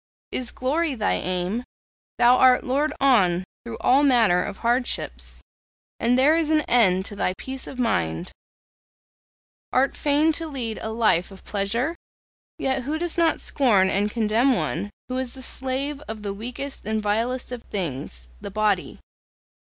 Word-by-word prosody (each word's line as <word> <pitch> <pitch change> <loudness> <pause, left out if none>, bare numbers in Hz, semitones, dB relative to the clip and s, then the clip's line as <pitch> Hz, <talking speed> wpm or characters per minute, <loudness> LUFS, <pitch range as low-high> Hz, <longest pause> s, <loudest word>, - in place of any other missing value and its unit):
Is 250 -1 -1
glory 290 +4 -1
thy 215 -3 0
aim? 185 +6 -2 0.5
Thou 245 +1 +6
art 255 -1 +5
lured 285 +4 0
on 190 -10 +3 0.2
through 235 -1 -7
all 270 +3 +4
manner 225 -10 +4
of 200 -2 -6
hardships, 240 +2 -2 0.6
and 245 +2 +2
there 285 +5 +5
is 325 -2 +1
an 310 -1 +4
end 190 -9 +3
to 205 - -5
thy 185 -2 -1
peace 265 0 -3
of 265 - -8
mind. 85 - -1 1.4
Art 265 +2 +2
fain 295 +2 +2
to 330 +1 -2
lead 245 -7 -4
a 220 - -4
life 220 -6 +2
of 195 -1 -14
pleasure? 230 +10 -1 0.6
Yet 265 0 0
who 295 +5 -2
does 345 0 -2
not 335 -2 +2
scorn 205 -9 +3
and 205 +2 +1
contemn 230 +4 +2
one 170 +3 -2 0.2
who 255 0 -2
is 260 -1 -4
the 260 - -8
slave 270 +3 -3
of 215 -1 -7
the 200 -1 -3
weakest 250 +6 -5
and 220 +1 -1
vilest 230 +5 -1
of 245 -2 -5
things 135 - -5
the - - -7
body? 210 -2 0
240 Hz, 160 wpm, -24 LUFS, 205-265 Hz, 1.4 s, Thou